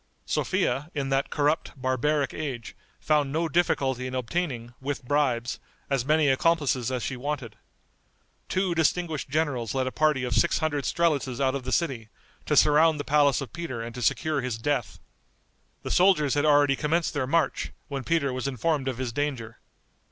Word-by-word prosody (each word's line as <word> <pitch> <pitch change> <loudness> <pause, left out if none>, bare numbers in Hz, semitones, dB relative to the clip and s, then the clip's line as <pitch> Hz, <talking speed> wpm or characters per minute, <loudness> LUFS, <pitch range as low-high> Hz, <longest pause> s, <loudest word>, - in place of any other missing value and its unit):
Sophia, 145 +3 0
in 140 -2 -2
that 135 +1 0
corrupt, 145 -1 0
barbaric 135 +2 0
age, 130 -7 -5 0.2
found 150 -3 +1
no 165 +3 0
difficulty 135 -6 0
in 130 - -5
obtaining, 125 -3 -3
with 140 -1 -4
bribes, 125 -4 0 0.3
as 135 -3 +1
many 155 +2 +3
accomplices 135 -3 +2
as 125 -2 -2
she 130 - -3
wanted. 130 -4 -4 0.9
Two 185 -1 0
distinguished 160 -2 0
generals 140 -6 -1
led 130 -1 +1
a 130 - -2
party 155 -3 +1
of 125 - -1
six 170 - +3
hundred 145 -3 -1
strelitzes 145 -7 0
out 135 -1 +2
of 135 -2 -4
the 130 - -3
city, 130 -10 -1 0.4
to - - +2
surround 155 +1 +5
the - - -2
palace 145 -2 +3
of 135 - -7
Peter 165 -8 -5
and 115 +1 -7
to 125 - -7
secure 150 +5 +1
his 125 -3 -3
death. 115 -8 -2 0.8
The - - -4
soldiers 175 -7 +4
had 145 +1 +1
already 145 -2 +4
commenced 160 +4 0
their 140 -4 -1
march, 160 0 0 0.2
when 140 -2 -4
Peter 150 -5 0
was 130 +1 -3
informed 140 +2 -1
of 130 -3 -2
his 125 -2 -3
danger. 130 -5 -3
140 Hz, 175 wpm, -26 LUFS, 130-155 Hz, 0.9 s, surround